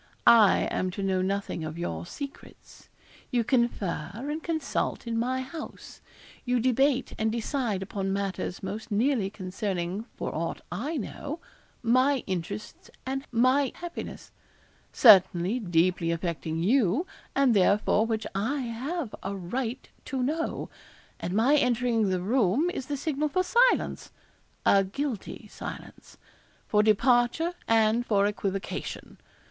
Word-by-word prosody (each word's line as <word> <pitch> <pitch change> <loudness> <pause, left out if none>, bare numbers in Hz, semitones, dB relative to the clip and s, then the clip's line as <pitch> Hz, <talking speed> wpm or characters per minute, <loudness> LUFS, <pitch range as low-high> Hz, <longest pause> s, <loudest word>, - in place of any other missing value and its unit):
I 220 -4 +7
am 185 - 0
to 200 - -2
know 190 -1 +1
nothing 195 -3 -2
of 155 +1 -5
your 85 - -4
secrets. 280 -1 -10 0.4
You 240 -2 +1
confer 225 - 0
and 295 +7 -4
consult 315 -6 -2
in 230 -1 -2
my 255 +3 0
house 290 +5 -9 0.4
you 250 -1 +1
debate 260 +2 +2
and 220 0 +1
decide 230 -3 -1
upon 195 -1 -3
matters 195 -2 -3
most 205 +4 -5
nearly 220 -1 +1
concerning, 190 0 -3
for - - -4
aught 165 +2 -3
I 295 +9 -3
know, 290 +6 -5 0.4
my 255 +3 +3
interests 185 +2 -5 0.2
and 270 +1 -3
my 255 +3 +3
happiness 345 -1 -7 0.6
certainly 190 -1 +6
deeply 175 -3 +1
affecting 165 -1 -2
you, 235 - +3 0.3
and 275 -3 +4
therefore 205 +3 +3
which 220 -2 -2
I 235 +9 -1
have 255 +4 -4
a 195 +1 -4
right 230 +7 -4 0.2
to 260 -1 -2
know; 315 +5 -2 0.5
and 180 +2 -3
my 245 +7 +4
entering 240 -5 +2
the 185 -1 0
room 240 - +2
is 265 -7 -5
the 290 - -2
signal 300 +1 -1
for 370 +4 +1
silence 485 +6 +2 0.5
a 195 0 +5
guilty 240 +4 -4
silence - - -9 0.5
for 210 - +4
departure 240 - +3
and 225 +1 +3
for 200 -4 +2
equivocation. 195 -2 -4
225 Hz, 130 wpm, -27 LUFS, 195-265 Hz, 0.6 s, I